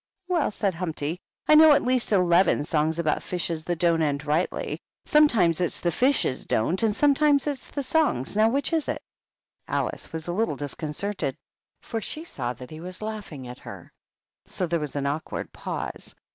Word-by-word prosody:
" 380 -2 -55
Well," 350 -4 +1
said 200 -2 -1
Humpty, 165 -1 -3
" - - -45
I - - +6
know 310 0 +9
at - - +3
least 255 -2 +1
eleven 180 -4 +4
songs 155 +1 0
about 155 -3 0
fishes 170 -3 -2
that 175 -1 -1
don't 170 -1 +2
end 145 -1 0
rightly. 155 +4 -1 0.3
Some 300 0 +6
times 180 - +2
it's 175 - -1
the 175 - 0
fishes 250 - +1
don't, 165 +12 +1
and 220 -2 +2
sometimes 290 0 +4
it's 285 -3 -4
the 285 - -3
songs. 260 - +1
Now, 215 +1 +5
which 280 +6 0
is 320 -3 +1
it?" - - -3 0.6
Alice - - -2
was 160 0 -5
a 175 - -1
little 215 -5 0
disconcerted, 150 +8 -3 0.4
for 225 -2 -4
she 305 +9 -4
saw 125 - -3
that 125 +3 -11
he 155 - -8
was 185 +4 -7
laughing 205 -12 -6
at 125 0 -9
her; - - -11 0.5
so 185 - -1
there 170 0 0
was 150 -2 -5
an 140 -1 -1
awkward 145 +3 -3
pause. - - -5
180 Hz, 190 wpm, -26 LUFS, 155-250 Hz, 0.6 s, know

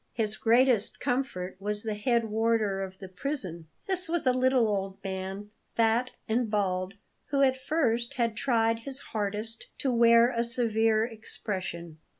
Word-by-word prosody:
His 215 -2 0
greatest 235 -1 +3
comfort 190 -8 -2
was 210 +1 -2
the 220 -1 -2
head 230 +2 +1
warder 220 -2 +1
of 190 -1 -6
the 190 - -9
prison. 185 - -4 0.2
This 365 -3 +1
was 340 -3 -1
a 255 - +4
little 255 -2 +3
old 195 -2 -2
man, 195 +2 -5 0.2
fat 230 +2 +2
and 225 +1 0
bald, 190 -2 -1 0.3
who 275 0 +2
at 260 -1 +4
first 260 -3 -1
had 235 -4 0
tried 230 -3 +1
his 270 +3 +1
hardest 215 +2 -2
to 265 - 0
wear 235 0 +5
a 235 -1 0
severe 225 -2 +2
expression. 190 -7 -5
225 Hz, 155 wpm, -28 LUFS, 200-245 Hz, 0.3 s, wear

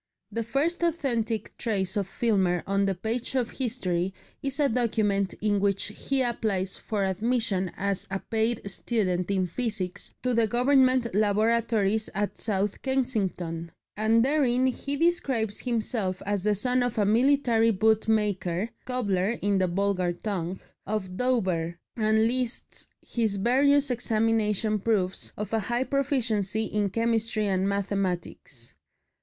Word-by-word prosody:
The 230 - -2
first 280 +10 0
authentic 245 -10 -1
trace 195 -5 -1
of 200 -3 0
Filmer 190 -6 +1
on 195 0 +1
the 195 - 0
page 225 +7 -3
of 245 -3 0
history 190 -8 -1 0.3
is 275 +1 -1
a 290 - +4
document 215 -5 +1
in 205 -1 +2
which 200 +1 +1
he 270 -1 0
applies 200 -6 -1
for 210 -3 -2
admission 200 -2 0
as 200 -1 -1
a 195 - -1
paid 220 +1 -1
student 185 -5 -1
in 190 -2 +1
physics 195 -1 -3
to 250 -1 +1
the 230 -1 +3
Government 255 0 +3
laboratories 215 0 +2
at 205 +1 -2
South 205 -2 -1
Kensington, 195 -11 -1 0.3
and 225 +2 +3
therein 260 -3 +2
he 275 +2 -1
describes 265 -10 +1
himself 220 -6 -1
as 205 -1 0
the 210 -1 +3
son 250 +5 +1
of 245 -2 -1
a 210 - +3
"military 235 0 +3
bootmaker" 210 -2 +1
("cobbler" 215 -4 0
in 200 -1 +2
the 185 - +2
vulgar 185 -1 0
tongue) 185 -1 -4 0.3
of 190 -3 -3
Dover, 185 -9 0 0.2
and 220 -1 +3
lists 245 +1 -1 0.2
his 220 -4 0
various 270 +6 +3
examination 220 -2 +1
proofs 195 -3 -1
of 210 0 -5
a 225 - +3
high 240 +4 -1
proficiency 240 -7 0
in 210 -2 0
chemistry 230 0 0
and 190 0 +1
mathematics. 185 - -3
215 Hz, 135 wpm, -27 LUFS, 195-240 Hz, 0.3 s, a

